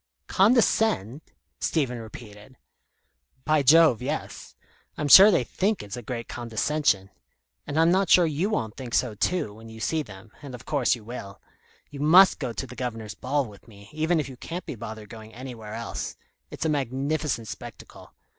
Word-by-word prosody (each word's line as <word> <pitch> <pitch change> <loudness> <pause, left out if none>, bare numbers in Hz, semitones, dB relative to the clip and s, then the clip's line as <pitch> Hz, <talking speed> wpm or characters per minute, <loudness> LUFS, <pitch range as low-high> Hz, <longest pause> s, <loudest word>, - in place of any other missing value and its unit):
"Condescend!" 205 - +2 0.4
Stephen 130 -7 -1
repeated. 110 +2 -12 0.9
"By 155 -1 +3
Jove, 150 -3 +5
yes. 145 +5 -5 0.4
I'm 150 - -2
sure 195 +8 +10
they 175 -11 +2
think 200 - -1
it's 105 +2 -7
a 125 - -7
great 115 0 -6
condescension. 115 -3 -1 0.6
And 145 +2 -1
I'm 165 +1 +5
not 190 -1 +2
sure 180 - +6
you 160 +6 -1
won't 110 - -2
think 125 -3 -5
so 125 -4 +1
too, 110 - -1
when 115 +1 -13
you 110 0 -11
see 160 +7 -1
them 105 -4 -12
as 140 -3 -8
of 125 - -13
course 140 -5 +1
you 115 - -13
will. 100 -4 -8 0.5
You 140 - -9
must 175 +6 +6
go 130 -4 -3
to 125 - -5
the 125 -1 -11
Governor's 115 -5 -5
ball 140 +2 -1
with 105 -1 -15
me, 100 -2 -15
even 160 +2 0
if 150 - -2
you 130 -2 -10
can't 175 +8 -7
be - - -5
bothered 110 -2 -8
going 110 0 -12
anywhere 115 -4 -8
else. 115 0 -5 0.3
It's - - -5
a - - +3
magnificent 140 -3 -2
spectacle. - - -11
130 Hz, 175 wpm, -25 LUFS, 110-155 Hz, 0.9 s, sure